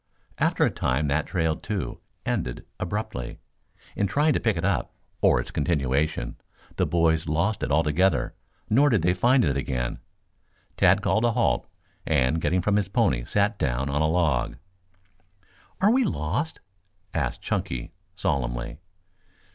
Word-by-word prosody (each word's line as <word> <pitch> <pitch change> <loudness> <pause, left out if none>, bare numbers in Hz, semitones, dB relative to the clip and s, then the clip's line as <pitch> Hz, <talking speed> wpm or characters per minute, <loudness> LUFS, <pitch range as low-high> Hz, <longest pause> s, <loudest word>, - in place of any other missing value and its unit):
After - - +3
a - - +1
time 70 +4 0
that 75 +2 0
trail, 80 -4 0
too, 95 - -4 0.3
ended - - -2
abruptly. - - -4 0.6
In 100 - +1
trying 150 +8 +2
to - - +1
pick 110 -6 +1
it 80 - -1
up, - - -1 0.3
or - - +5
its 80 - -5
continuation, 75 -2 0 0.4
the - - +2
boys 80 -1 +2
lost 85 +8 0
it - - -2
altogether, 80 +5 +2 0.3
nor 140 +7 +4
did 110 - +2
they 90 +1 +3
find 120 +6 +3
it 70 -3 +1
again. 65 -3 -2 0.8
Tad - - +4
called 110 - +2
a 120 -1 +3
halt - - +1 0.4
and 75 +1 +1
getting 85 +4 +1
from 105 +1 +2
his 100 -1 0
pony 95 - +1
sat - - +1
down 65 +2 0
on 75 +2 0
a 80 - +3
log. 85 -2 +1 1.2
"Are 200 +3 +5
we 260 +2 +4
lost?" 135 - -2 0.5
asked 70 -6 -2
Chunky 65 -2 -2 0.2
solemnly. 65 -6 -2
80 Hz, 145 wpm, -26 LUFS, 70-100 Hz, 1.2 s, or